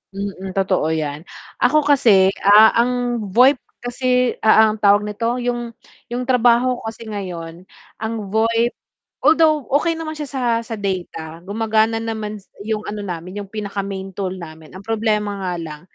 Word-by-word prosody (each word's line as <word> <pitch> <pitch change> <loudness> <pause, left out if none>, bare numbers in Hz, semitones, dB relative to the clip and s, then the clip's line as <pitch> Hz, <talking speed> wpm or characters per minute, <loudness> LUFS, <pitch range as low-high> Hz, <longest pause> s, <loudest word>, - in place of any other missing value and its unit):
Mm. 195 -1 -5
Totoo 190 -4 +1
'yan. 150 +1 -4 0.3
Ako 300 +5 +3
kasi, 220 -10 +5
ah, 210 +2 +7
ang 245 0 0
VoIP 255 +6 +5 0.2
kasi 250 0 +1
a 220 0 +6
ang 215 - -6
tawag 205 0 +4
nito, 230 +3 -2
yung 240 -1 -3 0.4
yung 245 +1 -3
trabaho 245 0 +3
ko - - -13
kasi 225 +1 -10
ngayon 175 -5 -6 0.4
ang 225 +1 -2 0.2
VoIP 230 +2 +2 0.5
although 310 0 +4
okey 330 +2 0
naman 315 -1 -5
siya 295 -2 -5
sa 265 -2 -4 0.2
sa 225 - -5
data, 175 -4 -4
gumagana 220 +2 +1
naman 220 -2 -4
s - - -30 0.2
yung 215 -1 -1
ano 210 0 -5
namin, 180 0 -6
yung 195 - -14
pinaka-main 200 -2 -5
tool 190 -2 -3
namin. 160 -2 -11
Ang 190 +2 -10
problema 210 -2 0
nga 180 -1 -2
lang, 155 -2 -7
215 Hz, 160 wpm, -20 LUFS, 190-245 Hz, 0.5 s, ah